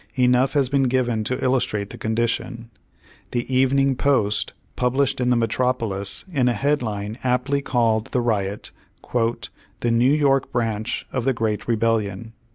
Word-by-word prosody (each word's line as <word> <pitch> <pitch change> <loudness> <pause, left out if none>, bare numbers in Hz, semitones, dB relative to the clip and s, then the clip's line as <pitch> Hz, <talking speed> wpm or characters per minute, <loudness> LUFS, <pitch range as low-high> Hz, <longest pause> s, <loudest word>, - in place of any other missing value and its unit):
Enough 125 0 +3
has 140 -3 +2
been 135 +1 +2
given 120 -3 0
to 130 +3 -1
illustrate 115 -6 0
the 120 - -9
condition. 115 +1 -2 0.6
The 120 -1 -1
Evening 135 +1 +3
Post, 110 -7 +1 0.2
published 130 +1 +1
in 125 - +2
the 125 - +4
metropolis, 115 -4 -1
in 130 -4 +2
a 125 - +3
headline 110 -4 -1
aptly 130 +3 +1
called 115 -5 +1
the 125 - -1
riot 105 -4 -1 0.4
"the 115 -1 -2
New 120 +3 +4
York 140 -3 +2
Branch 115 -2 -2
of 130 - -1
the 135 +1 +2
Great 110 -3 -2
Rebellion." 110 -2 0
120 Hz, 145 wpm, -22 LUFS, 110-130 Hz, 0.6 s, the